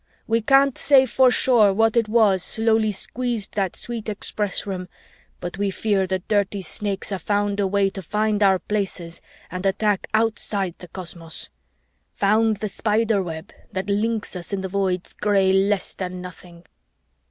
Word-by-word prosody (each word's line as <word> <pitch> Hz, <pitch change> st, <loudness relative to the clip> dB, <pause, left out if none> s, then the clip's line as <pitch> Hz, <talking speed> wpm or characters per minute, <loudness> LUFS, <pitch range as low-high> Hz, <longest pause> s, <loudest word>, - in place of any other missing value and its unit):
"We 230 Hz, +1 st, +1 dB
can't 275 Hz, +3 st, +4 dB
say 270 Hz, -2 st, +6 dB
for 260 Hz, +1 st, +4 dB
sure 235 Hz, -5 st, +4 dB
what 225 Hz, +3 st, +2 dB
was 215 Hz, -4 st, +4 dB
it -, -, -2 dB
slowly 220 Hz, -1 st, +2 dB
squeezed 230 Hz, +1 st, -3 dB
that 195 Hz, -4 st, -1 dB
sweet 230 Hz, -2 st, -5 dB
Express 205 Hz, -1 st, -2 dB
Room, 185 Hz, -2 st, -4 dB, 0.5 s
but 175 Hz, +2 st, -6 dB
we 200 Hz, -1 st, +1 dB
fear 195 Hz, -1 st, 0 dB
the 190 Hz, +1 st, 0 dB
dirty 200 Hz, +1 st, -1 dB
Snakes 200 Hz, +3 st, -4 dB
have 195 Hz, -3 st, -4 dB
found 205 Hz, +1 st, 0 dB
a 200 Hz, -, +2 dB
way 195 Hz, 0 st, +1 dB
to 195 Hz, -, -7 dB
find 210 Hz, +3 st, 0 dB
our 195 Hz, -2 st, +5 dB
Places 185 Hz, -3 st, -4 dB, 0.3 s
and 185 Hz, 0 st, -5 dB
attack 200 Hz, +1 st, +1 dB
outside 215 Hz, -4 st, 0 dB
the 180 Hz, -, -10 dB
cosmos! 170 Hz, -2 st, -8 dB, 0.7 s
found 215 Hz, +2 st, +2 dB
the 215 Hz, -, -3 dB
Spiderweb 205 Hz, -5 st, -1 dB, 0.2 s
that 190 Hz, +1 st, -3 dB
links 220 Hz, 0 st, -1 dB
us 180 Hz, +2 st, -6 dB
in 200 Hz, -1 st, -2 dB
the 190 Hz, -, -4 dB
Void's 185 Hz, -2 st, -1 dB
gray 195 Hz, -2 st, +2 dB
less 195 Hz, 0 st, +1 dB
than 180 Hz, -1 st, -5 dB
nothing." 175 Hz, -1 st, -11 dB
200 Hz, 160 wpm, -23 LUFS, 190-220 Hz, 0.7 s, say